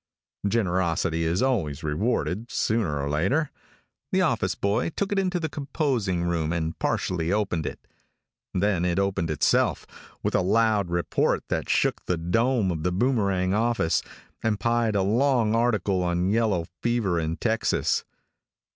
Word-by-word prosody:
Generosity 90 -6 0
is 85 +6 +1
always 85 - 0
rewarded, 105 +6 -1
sooner 100 -10 0
or 70 - -2
later. 95 - 0 0.6
The - - +3
office - - 0
boy 105 +9 0
took 200 +5 -3
it 200 - +2
into 185 -2 0
the 160 - -2
composing 135 - -1
room 85 -2 0
and 80 -1 -2
partially 85 -2 -1
opened 95 -7 0
it. - - -8 0.7
Then 95 -2 +1
it 90 0 0
opened 100 -4 0
itself, 75 - +1 0.4
with - - 0
a - - +3
loud 105 0 +2
report 85 0 0
that - - -2
shook - - +1
the 90 - +1
dome 110 +5 +1
of 80 -2 -3
The 90 +3 0
Boomerang 100 -4 +1
office, 115 -5 +1 0.4
and 110 -2 0
pied 115 0 +1
a 100 - +2
long 115 +1 +2
article 110 -5 +1
on 90 +1 0
yellow 105 -6 +1 0.2
fever 115 -8 +1
in 80 +1 -2
Texas. 115 -1 0
100 Hz, 145 wpm, -25 LUFS, 85-115 Hz, 0.7 s, The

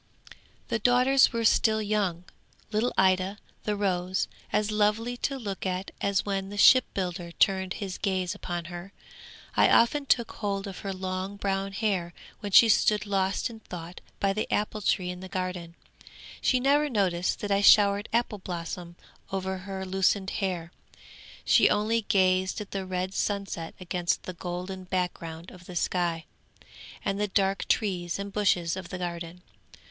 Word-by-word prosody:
'The 230 - 0
daughters 250 +4 +4
were 230 -1 -1
still 220 0 +4
young. 205 -5 -1 0.5
Little 225 +3 +1
Ida, 190 +1 +3 0.3
the 210 - 0
rose, 185 -2 0 0.2
as 210 0 +1
lovely 215 +3 +1
to 275 +2 -2
look 200 -6 -5
at 185 0 -3
as 200 -1 +1
when 195 -1 -2
the 205 - -7
shipbuilder 180 -7 +3
turned 190 0 +2
his 195 -3 -5
gaze 185 -3 -1
upon 175 -2 -5
her. 175 +2 -8 0.6
I - - +5
often 280 +5 +4
took 235 -3 +2
hold 200 -2 -3
of 195 -2 -7
her 195 - -4
long 185 +1 -4
brown 195 0 -1
hair 195 -5 -1 0.2
when 205 - -5
she 230 - +8
stood 215 -1 +3
lost 195 -1 0
in 230 -2 -10
thought 175 -4 -9 0.2
by 195 -1 +2
the 215 - -3
apple 210 0 -1
tree 180 -2 +1
in 180 - -8
the 190 0 -9
garden. 180 -2 -4 0.7
She 255 - +3
never 290 +3 +3
noticed 185 -7 0
that 205 - -3
I 200 0 +3
showered 205 0 +5
apple 230 -2 0
blossom 175 -1 -6 0.4
over 190 0 -2
her 190 0 -6
loosened 190 +1 +1
hair; 180 -4 -3 0.7
she - - +5
only 225 +2 +1
gazed 185 -1 +2
at 210 - -8
the 195 -1 -4
red 185 +1 -2
sunset 195 -5 -3
against 175 -1 -1
the 185 - -6
golden 180 +2 -5
background 175 -2 -3
of 180 -1 -14
the 180 - -9
sky, 170 -2 0 0.8
and 195 +1 -1
the 210 - +1
dark 195 0 0
trees 180 -5 0
and 200 0 -6
bushes 180 -5 +1
of 185 -2 -7
the 185 - -5
garden. 175 0 -5
190 Hz, 160 wpm, -27 LUFS, 180-210 Hz, 0.8 s, she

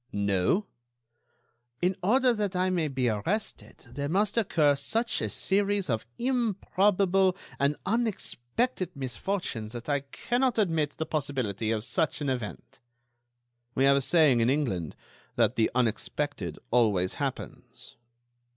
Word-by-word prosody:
"No?" 100 - +1 1.1
"In 180 +2 +1
order 250 +6 +4
that 205 -4 -2
I 185 +1 +1
may 170 -4 +1
be 130 -3 -1
arrested 165 - -3
there 140 +3 -3
must 200 +5 +1
occur 155 -10 +3
such 225 +12 0
a - - -1
series 200 -4 +1
of 110 0 -2
improbable 195 -6 +2 0.2
and 140 +1 +2
unexpected 200 - -1
misfortunes 130 - -3
that 120 -1 -7
I 145 -1 +2
cannot 240 - -1
admit 165 -8 +1
the 160 - -2
possibility 130 -9 -2
of 110 -1 -1
such 160 -1 0
an 145 -2 -2
event." 125 -5 -5 1.0
"We 135 - +2
have 140 0 +5
a - - +1
saying 150 -4 +4
in 115 +1 +3
England 115 - -1 0.4
that - - +2
'the 110 - +2
unexpected 120 - -1
always 105 -7 +2
happens. - - -6
150 Hz, 130 wpm, -28 LUFS, 120-195 Hz, 1.1 s, have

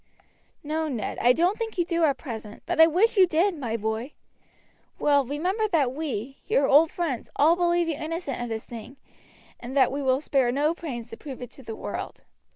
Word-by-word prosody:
"No, 310 +2 -2
Ned, 240 -8 -4
I 245 - +5
don't 355 - +1
think 450 -3 -4
you 345 - +2
do 335 -1 0
at 280 -3 +1
present; 220 -7 -8
but 345 -1 +2
I 320 - +9
wish 400 +8 +2
you 375 -1 +7
did, 345 +3 +2
my 235 -7 -3
boy. 220 +5 -3 0.8
Well, 285 -1 +3
remember 360 - -1
that 295 -10 +1
we, 270 -4 -4
your 275 - +3
old 305 +4 +6
friends, 310 -10 -3
all 315 +4 +5
believe 345 -1 +2
you 330 - 0
innocent 310 -3 -4
of 240 - -4
this 220 -1 -4
thing, 240 +3 -10 0.6
and 255 +3 -6
that 265 - +5
we 280 +2 -3
will 260 -1 +2
spare 270 -4 +1
no 295 +5 +1
pains 245 -9 -7
to - - -8
prove 275 -4 -8
it 245 -2 -8
to - - -12
the 225 -3 -7
world. - - -6
290 Hz, 205 wpm, -26 LUFS, 250-335 Hz, 0.8 s, I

